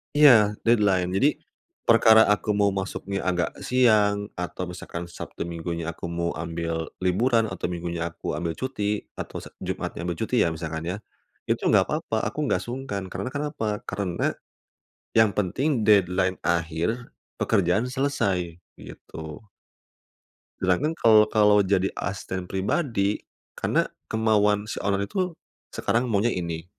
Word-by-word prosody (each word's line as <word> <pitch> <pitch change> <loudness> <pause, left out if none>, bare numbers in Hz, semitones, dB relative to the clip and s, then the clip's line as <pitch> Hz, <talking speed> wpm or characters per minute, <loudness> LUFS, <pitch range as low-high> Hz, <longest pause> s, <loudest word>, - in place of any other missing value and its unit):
Iya 115 -9 +7
deadline 100 -6 +3
jadi, 135 +11 +3 0.5
perkara 110 -1 +7
aku 105 +1 0
mau 100 0 +3
masuknya 95 0 -3
agak 90 -2 +1 0.2
siang 105 -5 +3
atau 90 +1 -4
misalkan 85 -1 -6
Sabtu 85 - -7
Minggunya 85 -1 -4
aku - - -7
mau 85 0 -1
ambil 85 0 -3 0.2
liburan 115 +5 +3
atau 90 -1 -3
Minggunya 85 -1 -4
aku - - -5
ambil 85 +1 -2
cuti 105 -6 -2 0.2
atau - - -5
se - - -9 0.2
Jumatnya - - -4
ambil 85 -1 -2
cuti 115 +3 -1
ya - - +2
misalkan 80 0 -5
ya, - - -3 0.5
itu - - +1
nggak - - +4
papa - - -1
aku - - -5
nggak - - +2
sungkan 120 -5 -4
karena 100 +7 -4
kenapa 145 -5 -3 0.2
karena, 95 -3 -1 0.8
yang 110 -2 +6
penting 105 - 0 0.2
deadline 95 -2 +3
akhir 85 -1 0 0.5
pekerjaan 100 0 +2
selesai 100 - -1 0.2
gitu. 80 +6 -10 1.1
Sedangkan 135 - +1
kalau 110 -1 +6
kalau 105 -1 +5
jadi 95 -1 +1
asisten 95 -2 -4
pribadi, 100 - 0 0.3
karena - - +1 0.2
kemauan 105 -2 +2
si 105 - -5
owner 100 0 0
itu, 180 - -2 0.3
sekarang 120 +5 0
maunya 110 +2 +2
ini, 85 -2 -4
100 Hz, 135 wpm, -25 LUFS, 90-110 Hz, 1.1 s, Iya